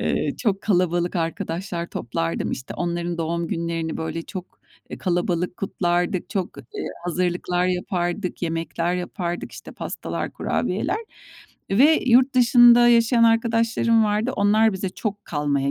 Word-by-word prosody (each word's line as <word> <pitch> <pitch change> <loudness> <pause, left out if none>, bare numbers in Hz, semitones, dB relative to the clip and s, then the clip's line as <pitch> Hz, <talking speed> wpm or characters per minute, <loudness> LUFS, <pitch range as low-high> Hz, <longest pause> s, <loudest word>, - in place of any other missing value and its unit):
Eee, - - 0
çok 200 -4 0
kalabalık 175 -3 +1
arkadaşlar 170 +1 -3
toplardım. 85 - -3
İşte, 130 - -6
onların 175 0 -2
doğum 170 +1 -2
günlerini, 165 -1 -2
böyle, 160 +1 -4
çok, 185 +1 -9 0.3
eee, - - -6
kalabalık 175 0 -1
kutlardık, 175 -2 -1
çok, 190 -4 -3
eee, 425 -2 -7 0.2
hazırlıklar 180 0 0
yapardık, 180 +1 -2
yemekler 165 +1 -1
yapardık, 175 -1 -4
işte, - - -10
pastalar, - - -5
kurabiyeler - - -1 0.7
ve 280 +11 +5
yurt 255 +3 +5
dışında 240 -1 +7
yaşayan 235 0 +4
arkadaşlarım 230 0 +3
vardı 215 +4 0
onlar 215 +2 +4
bize 190 0 -3
çok 205 +2 -5
kalmaya 145 -2 -1
180 Hz, 125 wpm, -23 LUFS, 170-225 Hz, 0.7 s, dışında